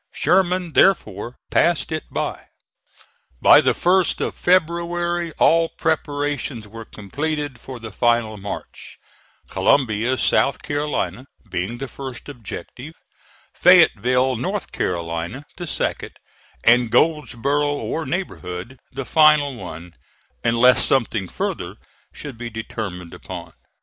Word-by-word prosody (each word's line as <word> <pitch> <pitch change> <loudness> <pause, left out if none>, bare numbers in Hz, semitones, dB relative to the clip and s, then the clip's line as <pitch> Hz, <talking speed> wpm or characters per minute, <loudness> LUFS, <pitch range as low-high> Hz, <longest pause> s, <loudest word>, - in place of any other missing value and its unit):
Sherman 180 0 +1
therefore 120 - +2 0.2
passed 170 -2 +2
it 155 0 -3
by. - - -4 0.9
By - - +7
the - - +2
first 185 +1 +2
of - - -2
February 175 -1 0
all 165 0 +4
preparations 145 -7 -2
were 115 +2 -10
completed 145 +6 -4
for 130 0 -9
the 115 -1 -8
final 115 0 +1
march, 100 0 -8 0.5
Columbia, 125 -1 +2
South 140 - +2
Carolina, 140 -6 -2 0.2
being 95 +7 -3
the 135 +2 -5
first 130 -1 -8
objective; 125 - -9 0.6
Fayetteville, 125 +1 +4
North 190 - -3
Carolina, 85 - -3
the 175 - -6
second; - - -2 0.5
and 120 0 +5
Goldsboro, 145 -1 +1
or 155 +2 -3
neighborhood, 120 - -5
the 135 0 -5
final 150 -3 +4
one, 85 -4 -9 0.5
unless 120 +2 +5
something 110 -7 +1
further - - -4 0.4
should 140 -6 -9
be 120 -1 -5
determined 105 -6 -6
upon. - - -9
130 Hz, 110 wpm, -21 LUFS, 115-155 Hz, 0.9 s, By